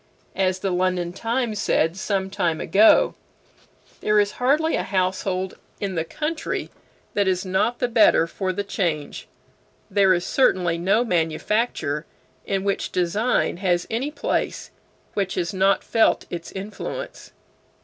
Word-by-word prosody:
As 185 -1 +1
the 190 0 -2
London 180 -1 0
"Times" 225 0 -1
said 165 +2 +1
some 190 0 -2
time 175 -5 0
ago: 205 +6 +5 0.9
"There 210 0 +3
is 205 0 +2
hardly 300 +6 +3
a - - 0
household 185 0 -1 0.2
in 200 -2 -2
the 165 -2 -1
country 310 - -3 0.4
that 205 -1 +1
is 185 0 0
not 190 +6 +1
the 245 - 0
better 225 -8 +5
for 185 +2 -3
the 200 +2 -3
change; 170 -7 -3 0.6
there 195 -1 +4
is 175 - -2
certainly 180 -10 +2
no 205 +7 +2
manufacture 165 -3 -1 0.4
in 195 -1 -1
which 200 -1 -1
design 190 +5 +1
has 175 -2 +1
any 245 +6 -1
place 300 - -2 0.4
which 195 -2 -1
has 175 +1 -2
not 195 +1 +2
felt 225 -1 +2
its 170 -1 -6
influence." 210 - -7
190 Hz, 140 wpm, -23 LUFS, 180-215 Hz, 0.9 s, ago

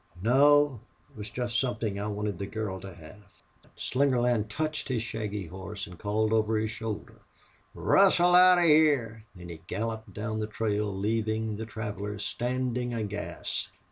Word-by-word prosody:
"No. 140 +4 +4 0.3
It - - -25
was 105 -1 -7
jest 120 0 -1
somethin' 110 -5 -2
I 105 - -2
wanted 105 -3 -3
the 100 - -3
girl 105 -4 -4
to 95 0 -9
hev." 85 +4 -13 0.6
Slingerland 125 -5 +1
touched 155 +6 -3
his 120 -4 -1
shaggy 105 -3 -4
horse 95 +4 -7
and 90 -4 -12
called 110 +1 0
over 110 0 +2
his 110 0 -1
shoulder: 110 -2 -6 0.5
"Rustle 180 -2 +4
out 180 0 +8
of 175 - +3
hyar!" 145 -9 +3
Then 90 -1 -10
he 80 -2 -9
galloped 110 +1 -4
down 110 +1 -4
the 105 - -2
trail, 105 -1 -1
leaving 110 +2 -1
the 110 0 -5
travelers 105 -2 -5
standing 125 0 -2
aghast. 105 -2 -4
110 Hz, 155 wpm, -28 LUFS, 105-125 Hz, 0.6 s, out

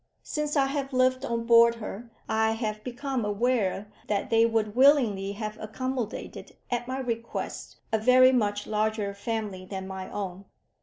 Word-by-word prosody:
Since 300 -1 -2
I 275 - +4
have 275 0 -3
lived 255 +1 +2
on 230 -2 -2
board 235 0 +6
her, 230 +1 -7 0.2
I 220 0 +2
have 215 -2 -3
become 255 0 -3
aware 210 -2 0 0.2
that 205 -1 -1
they 225 0 +5
would 220 -2 -1
willingly 240 -8 +4
have 215 +1 -5
accommodated, 245 +1 -5 0.2
at 240 0 -1
my 260 +1 -3
request, 235 -3 -4 0.2
a 220 - +3
very 255 +3 +6
much 205 -5 0
larger 215 -1 -1
family 205 -2 -4
than 190 0 -6
my 190 -1 -6
own. 195 -1 -5
225 Hz, 155 wpm, -27 LUFS, 210-255 Hz, 0.2 s, board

